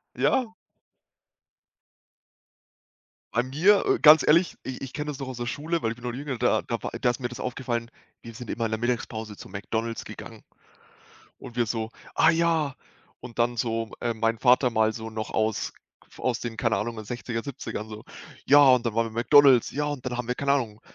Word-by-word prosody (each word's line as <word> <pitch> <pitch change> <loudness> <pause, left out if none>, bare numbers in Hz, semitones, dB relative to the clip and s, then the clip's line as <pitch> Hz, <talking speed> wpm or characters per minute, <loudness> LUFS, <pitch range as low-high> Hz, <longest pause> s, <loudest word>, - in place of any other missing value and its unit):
Ja. 245 -4 +1 2.8
Bei 120 - +2
mir, 165 +11 +3
äh, - - +3
ganz 155 +1 +8
ehrlich, 170 +4 +4
i 130 -1 -5
ich 135 -1 -6
kenne 150 -1 -4
das 140 -1 -8
noch 135 - -5
aus 130 - -6
der 120 0 -4
Schule, 160 +6 -2
weil 115 - 0
ich - - -11
bin 125 - -15
noch 120 - -2
jünger, 135 +1 -4
da - - +2
da - - -4
war - - -3
da 125 - +3
ist 120 - -4
mir 120 - -2
das 125 - -9
aufgefallen, 120 -2 -3 0.3
wir 115 -1 -10
sind 120 0 -8
immer 115 - -2
in 110 - -2
der 110 - -2
Mittagspause 110 -3 -3
zu - - -11
McDonald's 110 +4 -4
gegangen - - -10 1.0
und 125 -3 -11
wir 120 -1 +2
so: 110 0 -3 0.2
„Ah, 160 - +5
ja“, 165 -4 +1 0.5
und 120 -1 -11
dann 120 0 +1
so, 115 -1 -1
äh, 120 -1 -1
mein 115 +1 0
Vater 125 +1 +4
mal 110 -1 +2
so 110 -1 -6
noch 110 -1 -5
aus 110 -1 -1 0.4
aus 125 -2 -1
den, 115 -2 -5
keine 115 -2 +1
Ahnung, 110 +2 -3
60er, 120 0 -5
70ern 120 -5 -6
so: 110 +1 -9 0.4
„Ja, 145 +1 +7
und 125 -1 +3
dann 115 - -1
waren 115 0 +1
wir - - -12
McDonald's. 130 +2 +5
Ja, 150 - -2
und 145 -4 -4
dann 125 -1 -2
haben 125 -1 -4
wir, 125 - 0
keine 140 +2 +1
Ahnung, 115 -6 -1
120 Hz, 205 wpm, -26 LUFS, 115-135 Hz, 2.8 s, ganz